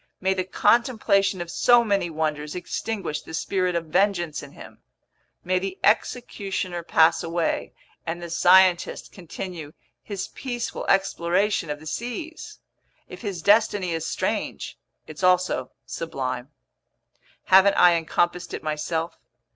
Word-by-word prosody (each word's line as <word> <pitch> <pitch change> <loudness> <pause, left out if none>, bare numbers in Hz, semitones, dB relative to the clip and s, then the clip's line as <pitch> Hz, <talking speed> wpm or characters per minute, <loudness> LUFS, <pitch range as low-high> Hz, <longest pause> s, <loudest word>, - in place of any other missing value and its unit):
May 190 +1 +1
the 185 -1 -1
contemplation 205 -2 +2
of 170 0 -6
so 240 +4 +5
many 200 -5 0
wonders 155 -1 -3
extinguish 180 -3 -4
the 160 - -8
spirit 185 0 -1
of 170 -1 -1
vengeance 175 -2 0
in 140 -1 -12
him! - - -13 0.6
May 185 +1 +1
the 190 0 -5
executioner 200 -5 0
pass 165 0 +3
away, 165 0 -2 0.3
and 165 +1 -4
the 170 -1 -8
scientist 180 +1 +4
continue 170 -3 -8 0.3
his 200 -3 -5
peaceful 245 -3 -5
exploration 195 -1 +1
of 150 0 -4
the 155 - -14
seas! 245 - -6 0.5
If - - -11
his 195 -7 -5
destiny 205 -3 +3
is 165 -1 -3
strange, - - -3 0.3
it's 155 +2 -10
also 180 -8 +2 0.2
sublime. 130 -5 -4 0.9
Haven't 190 +1 +5
I 180 -1 +7
encompassed 175 +1 -1
it - - -8
myself? 160 +2 -3
180 Hz, 130 wpm, -24 LUFS, 165-200 Hz, 0.9 s, I